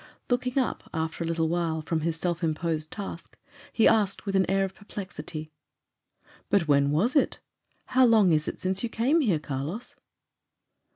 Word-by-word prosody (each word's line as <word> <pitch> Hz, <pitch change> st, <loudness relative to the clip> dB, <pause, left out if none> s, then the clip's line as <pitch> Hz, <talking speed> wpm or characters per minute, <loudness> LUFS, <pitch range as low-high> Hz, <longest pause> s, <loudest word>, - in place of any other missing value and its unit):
Looking 250 Hz, +1 st, 0 dB
up, 260 Hz, -3 st, -1 dB
after 160 Hz, +1 st, -2 dB
a -, -, -3 dB
little 165 Hz, -1 st, 0 dB
while, 165 Hz, -1 st, -1 dB
from 160 Hz, 0 st, -1 dB
his 165 Hz, +1 st, -1 dB
self 175 Hz, +1 st, -2 dB
imposed 155 Hz, -1 st, -1 dB
task, 195 Hz, -5 st, -7 dB, 0.3 s
he 225 Hz, -, +4 dB
asked, 210 Hz, -3 st, +2 dB
with 195 Hz, -1 st, -2 dB
an 190 Hz, -1 st, +3 dB
air 195 Hz, 0 st, +2 dB
of 190 Hz, -, -7 dB
perplexity, 175 Hz, -7 st, -7 dB, 1.0 s
"But 190 Hz, -6 st, +2 dB
when 140 Hz, -1 st, +4 dB
was 185 Hz, -, +1 dB
it? 285 Hz, -, +2 dB, 0.5 s
How 255 Hz, 0 st, +4 dB
long 215 Hz, -6 st, +5 dB
is 150 Hz, -1 st, +2 dB
it -, -, -4 dB
since 190 Hz, +1 st, -1 dB
you 235 Hz, -, -2 dB
came 265 Hz, +10 st, +2 dB
here, 205 Hz, -, +2 dB
Carlos?" 150 Hz, -, -5 dB
175 Hz, 170 wpm, -27 LUFS, 160-210 Hz, 1.0 s, long